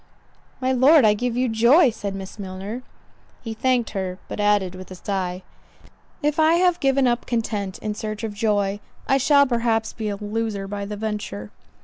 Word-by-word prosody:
"My 260 0 0
Lord, 260 +2 +6
I 210 - +6
give 240 +2 -2
you 255 +1 +2
joy," 240 +6 +5
said 200 -3 -5
Miss 195 +2 -8
Milner. 195 +5 -6 0.6
He 225 - -4
thanked 245 0 +1
her, 190 -3 -3
but - - -6
added 205 -3 +2
with 185 0 -10
a 185 - -8
sigh, 185 -1 -3 0.8
"If 295 +1 +1
I 315 +1 +5
have 355 0 +3
given 270 -1 +2
up 240 0 0
content 210 -5 -2
in 215 - -4
search 215 +1 -5
of 220 -2 -3
joy, 205 -2 0 0.3
I 270 - +3
shall 280 +1 +5
perhaps 230 -3 0
be 215 -2 -3
a 205 - -2
loser 210 -1 -3
by 200 0 -4
the 205 +1 -6
venture." 205 - -4
220 Hz, 185 wpm, -23 LUFS, 200-250 Hz, 0.8 s, Lord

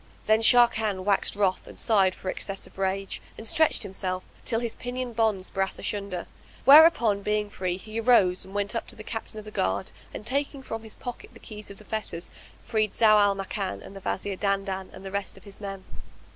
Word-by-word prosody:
Then 220 +1 +4
Sharrkan 220 -5 +4
waxed 200 0 +1
wroth 195 -2 0
and - - -10
sighed 195 -4 +3
for 185 - -5
excess 195 +1 -4
of - - -15
rage 195 0 -2 0.2
and 220 - -7
stretched 315 +4 +3
himself, 185 -1 -3 0.2
till 225 - +1
his 235 -2 -2
pinion 250 0 -5
bonds 215 -4 0
brass 195 0 -1
asunder; 200 -4 -3 0.4
whereupon 270 -8 +7
being 210 0 -1
free 180 -1 -2
he 215 +4 -6
arose 220 -6 +4
and 190 +1 -12
went 205 +1 0
up 230 - -3
to - - -8
the 215 - -10
Captain 220 0 -6
of 215 - -7
the 215 - -9
guard, 95 - -1 0.2
and 210 - -8
taking 275 +2 -1
from 225 -3 -5
his 220 -1 -10
pocket 245 -1 -7
the - - -14
keys 210 -1 -10
of 200 - -10
the 215 - -13
fetters, 210 -6 -5 0.3
freed 215 -3 0
Zau 215 -2 +6
al 200 -1 +4
Makan 195 0 -4
and 195 - -11
the - - -7
Wazir 195 0 -2
Dandan 195 -1 -1
and 195 - -11
the 195 - -6
rest 200 0 -4
of - - -15
his 200 0 -12
men. 195 -1 -6
205 Hz, 210 wpm, -27 LUFS, 195-225 Hz, 0.4 s, whereupon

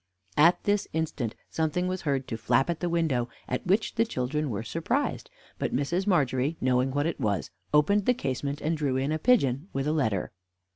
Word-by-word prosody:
At 165 +4 +5
this 205 0 +1
instant 155 -8 -2 0.2
something 160 +3 0
was 185 0 -2
heard 135 -4 -1
to 115 - -3
flap 120 +7 +2
at 170 - -4
the 175 - -1
window, 155 -8 +1 0.2
at 125 +7 -3
which 200 +4 +2
the 230 - +3
children 150 - -2
were 110 -2 -3
surprised; 165 - -2 0.3
but - - -1
Mrs. 170 +9 0
Margery, 140 -4 +1
knowing 125 0 +2
what 145 +2 0
it 165 -2 -2
was, 105 -7 -1 0.2
opened 195 +7 +3
the 250 - +4
casement, 140 - -3
and 160 +2 0
drew 140 -4 0
in 135 +3 0
a 155 - 0
pigeon 150 - +2
with 135 0 -1
a 150 - +1
letter. 110 - 0
150 Hz, 195 wpm, -28 LUFS, 130-175 Hz, 0.3 s, At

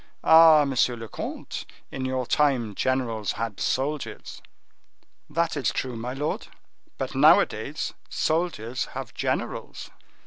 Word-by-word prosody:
Ah, 160 -2 +8
monsieur 130 -2 +1
le 115 -1 -8
comte, - - -6 0.3
in 130 - -4
your 130 -1 -1
time, 130 -6 +1
generals 115 -3 -1
had 115 -2 -4
soldiers!" 140 +3 -3 0.9
"That 165 -1 0
is 140 - 0
true, 130 -2 -3
my 120 +2 -4
lord, 145 +3 -3 0.5
but - - -4
nowadays - - +3 0.2
soldiers 155 -7 -1
have 125 -4 -6
generals." - - -3
130 Hz, 115 wpm, -25 LUFS, 115-150 Hz, 0.9 s, Ah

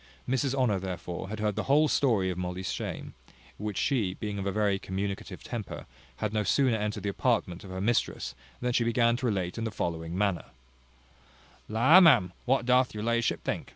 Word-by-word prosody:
Mrs 130 +1 0
Honour, 120 -7 +2
therefore, 90 0 -5
had 110 0 -5
heard 105 -1 0
the 110 - -2
whole 150 +2 +5
story 110 -11 +2
of 90 - -5
Molly's 90 +1 -3
shame; - - -5 0.5
which 105 -2 -4
she, 110 -10 +1
being 105 -2 -4
of 100 - -3
a - - +1
very 100 -1 +1
communicative 95 0 -4
temper, 115 -5 -6 0.3
had 105 +8 -3
no 110 - +1
sooner 130 +4 +3
entered 105 -1 -3
the 100 - 0
apartment 100 -5 0
of 95 - -10
her 95 0 -5
mistress, 100 - 0 0.3
than 125 0 0
she 120 - +3
began 115 0 +3
to 130 0 -1
relate 95 -2 -2
in - - -2
the 115 - -1
following 85 -3 -3
manner: 100 -3 0 1.2
"La, 130 - +7
ma'am, 100 - +6
what 130 -1 +2
doth 125 -1 +3
your 105 - -4
la'ship 115 0 0
think? - - -3
105 Hz, 190 wpm, -29 LUFS, 95-120 Hz, 1.2 s, La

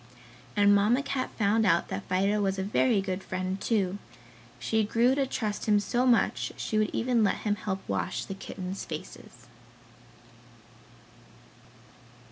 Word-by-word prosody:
And 205 0 +5
Mamma 215 +7 +3
Cat 270 -2 -2
found 220 +1 +2
out 170 -5 +2
that 95 - -5
Fido 195 +3 +2
was 195 -1 0
a 190 - -1
very 210 +2 +2
good 190 0 -3
friend, 185 +1 -4
too. 200 -4 0 0.6
She 220 -1 0
grew 235 +4 +3
to 275 -1 0
trust 215 -4 -3
him 210 -1 +4
so 245 +5 0
much 240 -2 +2
she 215 - -1
would 215 - +2
even 240 -2 +1
let 205 - +2
him 210 - +2
help 195 -2 -4
wash 95 -4 -2
the - - -5
kittens' 190 0 -6
faces. 140 -6 -9
205 Hz, 145 wpm, -28 LUFS, 190-225 Hz, 0.6 s, And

